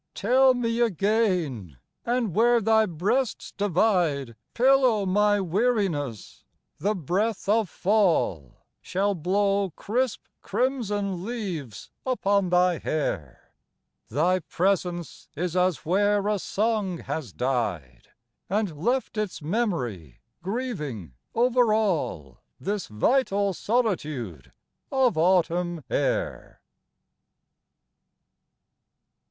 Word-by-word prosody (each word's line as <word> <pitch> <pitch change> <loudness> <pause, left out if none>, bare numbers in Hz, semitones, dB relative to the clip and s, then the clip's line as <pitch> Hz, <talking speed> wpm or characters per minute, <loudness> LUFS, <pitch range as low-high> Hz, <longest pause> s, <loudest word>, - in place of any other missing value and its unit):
Tell 255 +4 +4
me 230 -1 -1
again, 185 - 0 0.3
and 240 -6 0
where 235 +3 +4
thy 220 0 +3
breasts 205 +9 -1
divide 175 - +1 0.2
Pillow 255 -4 +4
my 205 +2 +3
weariness 185 - -1 0.4
the 210 +2 0
breath 195 +7 -1
of 215 -2 +2
fall 175 - 0 0.2
Shall 200 +2 0
blow 195 +3 +1
crisp 245 +2 -1 0.2
crimson 205 -8 -1
leaves 185 - -5
upon 200 -7 +1
thy 180 -1 +3
hair; 85 - -4 0.6
Thy 170 +9 +2
presence 175 -1 -2
is 175 +2 -2
as 180 -2 +1
where 205 +3 +2
a 210 -1 +1
song 210 -3 -1
has 155 - -5
died, 90 - -2 0.4
And 200 -4 -1
left 245 -2 0
its 210 -3 -3
memory 140 - -2 0.2
grieving 170 - -4 0.2
over 245 -1 +3
all 160 - -1 0.2
This 200 -1 -3
vital 200 - +1
solitude 155 - -2 0.4
of 265 -3 +3
autumn 175 -1 +1
air. - - -2
195 Hz, 90 wpm, -26 LUFS, 160-220 Hz, 0.6 s, Tell